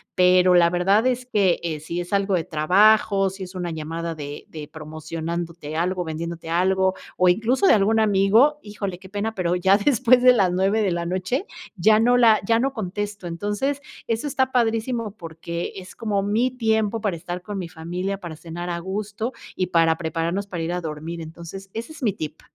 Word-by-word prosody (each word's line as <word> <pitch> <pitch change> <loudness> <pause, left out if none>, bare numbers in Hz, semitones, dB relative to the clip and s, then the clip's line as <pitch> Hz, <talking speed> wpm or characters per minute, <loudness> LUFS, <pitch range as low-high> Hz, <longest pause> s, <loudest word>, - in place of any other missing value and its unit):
Pero, 180 0 +5
la 170 -1 +6
verdad 190 +6 +2
es 250 0 -1
que, 200 -7 +2
eh, 160 -3 -3
sí 170 +3 -4
es 175 +3 -7
algo 200 -1 +2
de 170 - 0
trabajo, 195 +5 +4
si 190 +1 -8
es 185 +1 -10
una 175 -2 -3
llamada 165 +1 -4
de 145 -1 -7
de 150 -2 -8
promocionándote 160 +1 -6
algo, 180 +2 0
vendiéndote 165 +1 -5
algo, 190 +2 +2 0.2
o 180 - +4
incluso 230 - +2
de - - +7
algún 220 +2 +3
amigo, 220 +8 +4
híjole, 200 -3 -5
qué 190 - -13
pena, 205 +3 -3
pero, 180 -2 0
ya 190 +2 +4
después 250 +2 +4
de 255 - +9
las 195 -6 +2
9, 195 +4 +2
de 195 - +1
la 170 0 -2
noche, 185 - -2 0.3
ya 215 +3 +4
no 245 +2 +4
la 225 -3 +6
ya 225 +2 +3
no 270 +3 +1
contesto. 205 -3 -4
Entonces, 205 +11 -2 0.3
eso 230 +5 -1
está 260 -2 0
padrísimo 230 -1 0
porque, 170 +1 -6
es 185 0 -10
como 205 -3 -1
mi 225 +6 +1
tiempo 220 -3 0
para 205 -5 -1
estar 175 +2 -6
con 205 +2 -6
mi 180 -3 -4
familia, 180 +4 -4
para 175 -4 -7
cenar 170 +2 -6
a 170 0 -2
gusto 210 +6 -4 0.2
y 185 - -1
para 165 -2 +3
prepararnos 170 +4 -2
para 175 -4 -4
ir 165 - -2
a 180 - -2
dormir. 160 +2 -6
Entonces, 170 +4 -9
ese 230 +7 -6
es 315 - -11
mi 215 -5 +2
tip. 155 -1 -7
190 Hz, 195 wpm, -23 LUFS, 170-215 Hz, 0.3 s, de